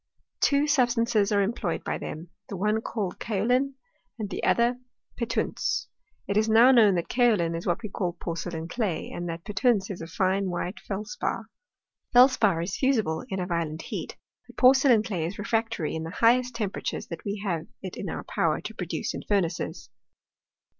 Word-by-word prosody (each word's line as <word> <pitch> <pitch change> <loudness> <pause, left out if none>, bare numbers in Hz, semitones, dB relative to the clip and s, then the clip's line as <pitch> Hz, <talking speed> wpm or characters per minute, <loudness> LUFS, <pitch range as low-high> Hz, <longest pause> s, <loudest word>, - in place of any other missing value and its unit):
Two 285 +1 +3
substances 240 -7 +2
are 200 -1 +3
employed 195 -4 -2
by - - -2
them, 160 +2 -7 0.2
the 195 - -5
one 210 +3 +1
called 205 -6 -4
kaolin 245 +6 +1 0.4
and 210 -3 -5
the - - -4
other 240 +1 +2 0.4
petunse. 235 -1 -1 0.4
It 200 - 0
is 215 +1 +2
now 230 +4 +7
known 220 -6 +6
that 170 - -1
kaolin 215 -9 +2
is 165 - -5
what 175 +6 0
we 215 - -4
call 180 -2 -2
porcelain 170 -1 -5
clay, 200 -3 -2
and 175 0 -4
that 165 0 -5
petunse 210 -1 +1
is 180 - -6
a 165 - -6
fine 190 +3 0
white 180 +3 -3
felspar. 210 +1 -4 0.6
Felspar 235 -9 +5
is 185 +3 -3
fusible 220 - +1
in 190 - -2
a 180 - -1
violent 165 -3 -2
heat, - - -6 0.3
but - - -16
porcelain 255 -3 +6
clay 185 -7 -2
is 175 +5 -4
refractory 225 -5 -1
in 160 - -3
the 160 - -5
highest 240 +5 +3
temperatures 210 -4 -3
that 170 - -7
we 200 +1 -3
have 170 -5 -2 0.2
it 185 - -6
in - - -5
our - - -4
power - - 0
to - - -7
produce - - -3
in - - -5
furnaces. 185 -4 -1
205 Hz, 175 wpm, -27 LUFS, 175-235 Hz, 0.6 s, now